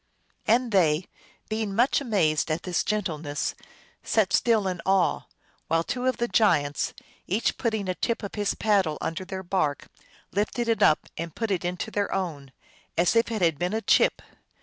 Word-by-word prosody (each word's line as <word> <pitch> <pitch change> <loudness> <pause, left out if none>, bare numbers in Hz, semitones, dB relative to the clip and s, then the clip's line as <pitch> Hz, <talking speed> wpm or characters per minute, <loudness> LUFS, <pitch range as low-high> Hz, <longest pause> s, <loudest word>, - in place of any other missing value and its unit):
" - - -40
And 235 +2 +3
they> 170 -4 +3 0.4
being 215 -2 -2
much 245 +6 +3
amazed 170 - +1
at 155 +1 -1
this 180 -3 0
gen 210 0 0
tleness, 150 -4 -3 0.5
sat 205 -4 +1
still 220 -4 +3
in 180 -2 -3
awe, 190 -2 +1 0.4
while 165 +1 +2
two 250 +7 -2
of 255 - +1
the 240 - 0
giants, 150 -12 +2 0.3
each 210 +6 0
putting 220 -4 -1
a 185 - 0
tip 230 +5 -2
of 200 - -5
his 205 -1 -1
paddle 195 -8 +2
under 170 +4 -3
their 190 0 -6
bark, 175 -6 -1 0.4
lifted 215 +4 -1
it 230 -1 +1
up 155 - +4
and 165 -1 -5
put 225 -2 -2
it 180 -3 0
into 180 +4 -3
their 205 -1 -1
own, 150 -8 -3 0.5
as 175 +5 +3
if 230 0 +3
it 215 -5 -1
had 165 -4 +2
been 180 +3 -1
a 220 - 0
chip. - - +3
195 Hz, 185 wpm, -26 LUFS, 165-220 Hz, 0.5 s, up